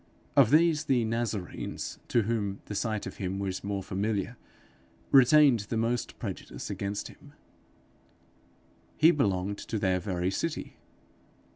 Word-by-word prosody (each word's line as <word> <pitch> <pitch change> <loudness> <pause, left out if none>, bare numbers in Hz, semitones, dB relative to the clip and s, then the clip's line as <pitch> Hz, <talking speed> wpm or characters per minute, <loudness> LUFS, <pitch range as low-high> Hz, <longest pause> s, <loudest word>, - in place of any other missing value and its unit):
Of 135 -6 +6
these 155 +1 +4
the 125 -5 +2
Nazarenes, 110 -4 -3
to 120 - +2
whom 100 -3 -2
the - - -6
sight 110 0 -2
of - - -7
him 95 0 -3
was 95 -1 -3
more 100 -1 -3
familiar, 100 +4 -2 0.8
retained 135 -1 +7
the 115 - -1
most 115 +1 -1
prejudice - - -6
against 100 +1 -3
him: - - -16 1.6
he 160 +2 +7
belonged 100 - 0
to 110 - -4
their 95 -3 +1
very 90 -1 -2
city! 165 +10 -3
110 Hz, 130 wpm, -29 LUFS, 100-125 Hz, 1.6 s, retained